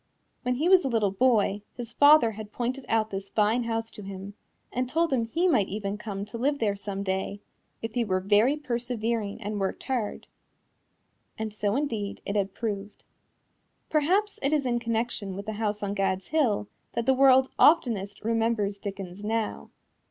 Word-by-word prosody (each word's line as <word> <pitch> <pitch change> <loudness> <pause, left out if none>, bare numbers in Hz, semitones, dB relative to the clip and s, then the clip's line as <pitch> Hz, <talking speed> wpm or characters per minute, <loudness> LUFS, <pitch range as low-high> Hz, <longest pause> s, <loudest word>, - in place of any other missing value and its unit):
When 250 0 0
he 305 +7 0
was 370 -1 +6
a - - 0
little 220 -5 +2
boy 210 -2 +2 0.2
his 235 -1 -6
father 290 -5 +6
had 215 0 -8
pointed 255 +3 -3
out 220 -1 +1
this 195 0 -5
fine 220 +3 +2
house 225 0 -2
to 210 - -10
him, 195 0 -7 0.4
and 250 0 -1
told 330 +1 +1
him 235 -3 +1
he 335 +11 +1
might 235 - +3
even 200 0 -3
come 200 -3 -5
to 230 +2 -7
live 285 +4 +1
there 210 -5 0
some 200 0 -4
day, 190 +1 -2 0.4
if 225 -1 -4
he 240 - +1
were 185 -4 0
very 210 +9 +3
persevering 235 -5 -2
and 210 +1 -3
worked 195 -1 -2
hard. 245 -6 -2 1.1
And 220 -1 -4
so, 210 0 0
indeed, 225 -8 -2
it 200 - -3
had 195 -1 0
proved. 205 -2 -4 0.9
Perhaps 370 +8 +2
it 275 +2 +1
is 295 -3 +1
in 240 -1 +1
connection 230 -4 -2
with 200 +1 -6
this 215 -1 -4
house 210 -1 -1
on 200 0 -1
Gad's 190 -1 -1
Hill 245 -10 +1 0.3
that 235 - -1
the 265 - +5
world 265 0 +5
oftenest 225 - +3
remembers 225 -3 0
Dickens 195 -1 -6
now. 220 +1 -2
225 Hz, 180 wpm, -27 LUFS, 200-250 Hz, 1.1 s, was